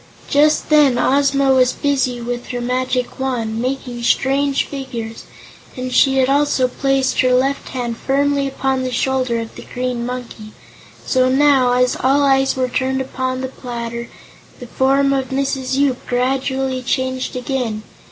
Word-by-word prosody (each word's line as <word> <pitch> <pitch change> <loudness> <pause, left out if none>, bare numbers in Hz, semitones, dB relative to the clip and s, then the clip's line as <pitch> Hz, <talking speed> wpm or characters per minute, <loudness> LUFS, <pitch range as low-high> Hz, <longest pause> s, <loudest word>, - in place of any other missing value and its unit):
Just 300 +2 +2
then 290 -5 +5
Ozma 275 +1 +3
was 255 -1 +3
busy 265 -4 0
with 240 +1 -5
her 245 - -4
magic 250 +1 -2
Wand, 230 -4 -2
making 250 -1 -3
strange 275 +3 +1
figures, 240 -5 -7 0.5
and 255 0 -4
she 270 -1 +4
had 260 -1 +3
also 280 -2 +2
placed 270 +1 0
her 255 - +2
left 270 +2 0
hand 240 -3 -4
firmly 280 +1 +1
upon 265 -1 -1
the 255 - -2
shoulder 255 -1 0
of 225 -1 -6
the - - -12
Green 250 -1 -2
Monkey. 240 -3 -7 0.5
So 255 -1 +2
now, 265 -2 +4
as 250 0 +2
all 275 +3 +2
eyes 270 -1 +3
were 260 -1 0
turned 260 +1 -1
upon 260 0 -3
the 260 - -2
platter, 235 -2 -6 0.5
the 245 - -8
form 275 +3 +2
of 265 -1 -1
Mrs. 270 -1 -1
Yoop 275 -3 0
gradually 260 +1 -1
changed 260 0 -2
again. 250 -4 -3
260 Hz, 150 wpm, -18 LUFS, 250-270 Hz, 0.5 s, then